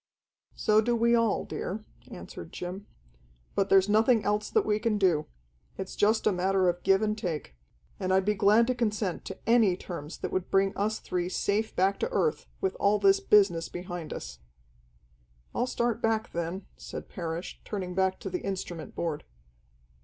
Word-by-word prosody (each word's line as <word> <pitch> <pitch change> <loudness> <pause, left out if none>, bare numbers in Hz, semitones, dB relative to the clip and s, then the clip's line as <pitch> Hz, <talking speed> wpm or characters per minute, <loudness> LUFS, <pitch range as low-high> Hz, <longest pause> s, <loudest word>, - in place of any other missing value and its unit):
"So 215 0 +3
do 240 +2 +1
we 235 +1 +3
all, 230 -3 +2
dear," 210 +4 -5 0.2
answered - - -9
Jim. 185 +3 -6 0.7
"But 195 0 +1
there's 195 0 +5
nothing 220 +2 +4
else 210 +1 0
that - - +2
we 210 0 +1
can 225 -1 +1
do. 175 -6 +2 0.5
It's 190 - -5
just 220 +2 +2
a 215 - +5
matter 190 0 +2
of 175 0 -2
give 195 +2 +3
and 210 0 +1
take. 170 - -4 0.4
And 185 - -1
I'd 190 0 +3
be 210 - +3
glad 210 +3 +5
to 255 - +1
consent 210 -6 -1
to 190 - -6
any 225 -6 +4
terms 165 -4 -7
that - - -4
would 185 -1 -2
bring 195 +1 +2
us 215 +2 0
three 180 -3 -3
safe 210 +3 -1
back 195 +2 +2
to 470 - -1
earth, 465 -2 0
with 385 -1 0
all 205 +1 +4
this 390 - +4
business 195 - +3
behind 175 -2 -6
us." - - -7 1.1
"I'll 245 - 0
start 235 -2 -1
back, 225 0 0
then," 170 +3 -4
said - - -8
Parrish, 170 0 -5
turning 185 -4 -4
back 190 0 +1
to - - -4
the 360 - -2
instrument 185 -4 -5
board. 160 -3 -2
200 Hz, 175 wpm, -28 LUFS, 180-220 Hz, 1.1 s, there's